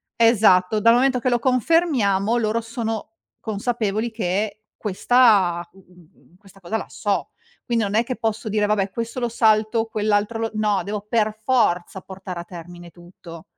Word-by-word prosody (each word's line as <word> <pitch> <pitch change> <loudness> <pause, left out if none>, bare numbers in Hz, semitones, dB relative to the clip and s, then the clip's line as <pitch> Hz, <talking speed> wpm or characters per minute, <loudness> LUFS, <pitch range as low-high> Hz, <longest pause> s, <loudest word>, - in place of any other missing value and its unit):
esatto, 215 -3 +4
dal 230 +2 +5
momento 255 0 +2
che 255 +1 0
lo 240 - +2
confermiamo, 240 - +2
loro 225 0 0
sono 225 -1 -5 0.2
consapevoli 220 0 -2
che 210 0 -2
questa, 205 -4 +3
mhmm, 180 -2 -22
questa 195 -1 -19
cosa 180 +5 -2
la - - -7
so. 205 -2 -2 0.4
Quindi 235 -2 0
non 200 0 -3
è 230 - +3
che 255 +1 -4
posso 220 0 -3
dire: 210 0 +1
"Vabbè, 205 -2 0
questo 230 +3 -4
lo 240 -1 -1
salto, 220 0 +2
quell'altro 215 0 -1
lo" 225 0 -2
no, 210 -2 +1
devo 205 0 -5
per 215 -2 0
forza 190 -7 +1
portare 190 -2 -8
a 170 - -5
termine 175 0 -11
tutto. 175 -1 -13
215 Hz, 160 wpm, -22 LUFS, 195-230 Hz, 0.4 s, dal